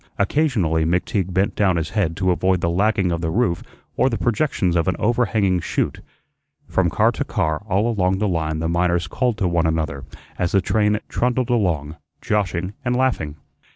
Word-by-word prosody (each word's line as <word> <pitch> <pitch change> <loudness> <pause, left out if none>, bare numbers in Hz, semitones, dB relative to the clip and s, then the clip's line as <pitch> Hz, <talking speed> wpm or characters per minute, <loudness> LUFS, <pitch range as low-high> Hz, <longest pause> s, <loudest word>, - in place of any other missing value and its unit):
Occasionally 100 - +1
McTeague 90 +3 0
bent 100 +3 0
down 95 -3 +2
his 80 0 -2
head 95 -7 0
to 95 -2 +2
avoid 95 +1 +1
the 85 0 0
lagging 100 0 +1
of 85 -1 -2
the 80 - -1
roof 85 -2 0 0.3
or 130 +3 +3
the 115 - -2
projections 110 - 0
of 85 -1 +1
an 95 - +1
overhanging 105 -5 +1
shute. - - -2 0.7
From - - +1
car - - +3
to - - -3
car 80 +1 -1
all 100 +4 +2
along 95 -5 +1
the 105 +2 0
line 80 -4 -1
the 80 +1 -2
miners 85 0 +1
called 120 +7 -1
to 100 -4 0
one 85 -1 +1
another 80 -4 -2 0.4
as 90 - 0
the 100 - +5
train 105 +1 +1
trundled 125 0 0
along, 80 -9 0 0.2
joshing 95 -3 -1
and 125 -1 0
laughing. 125 - 0
95 Hz, 185 wpm, -21 LUFS, 85-110 Hz, 0.7 s, the